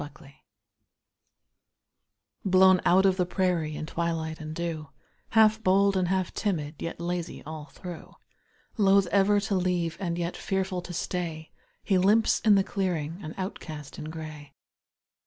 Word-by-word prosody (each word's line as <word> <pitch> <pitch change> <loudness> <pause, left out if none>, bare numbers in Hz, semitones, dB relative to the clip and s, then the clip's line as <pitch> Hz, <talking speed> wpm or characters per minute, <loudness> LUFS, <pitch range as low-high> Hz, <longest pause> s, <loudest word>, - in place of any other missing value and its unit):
COYOTE 140 0 -16 2.1
Blown 185 -1 +5
out 190 +2 +5
of 190 -1 +3
the 180 - +2
prairie 175 -5 0
in 155 - -4
twilight 160 -1 -3
and 155 0 -6
dew, 165 -3 -4 0.4
Half 220 -1 +5
bold 195 0 +3
and 185 -1 +1
half 185 0 -1
timid, 155 -7 -2
yet 165 - -5
lazy 175 0 -4
all 155 -1 -7
through; 175 +1 -10 0.6
Loath 200 -2 +5
ever 200 +2 +4
to 200 0 -2
leave, 180 -3 0
and 170 -3 -2
yet 170 0 -2
fearful 190 -1 -2
to 175 - -9
stay, 165 -2 -4 0.3
He 190 -3 +2
limps 210 +4 +4
in 215 -2 +5
the 195 - +4
clearing, 175 -4 -2
an 155 0 -7
outcast 155 -6 -6
in - - -6
gray. 155 -2 -8
180 Hz, 145 wpm, -27 LUFS, 160-190 Hz, 2.1 s, Blown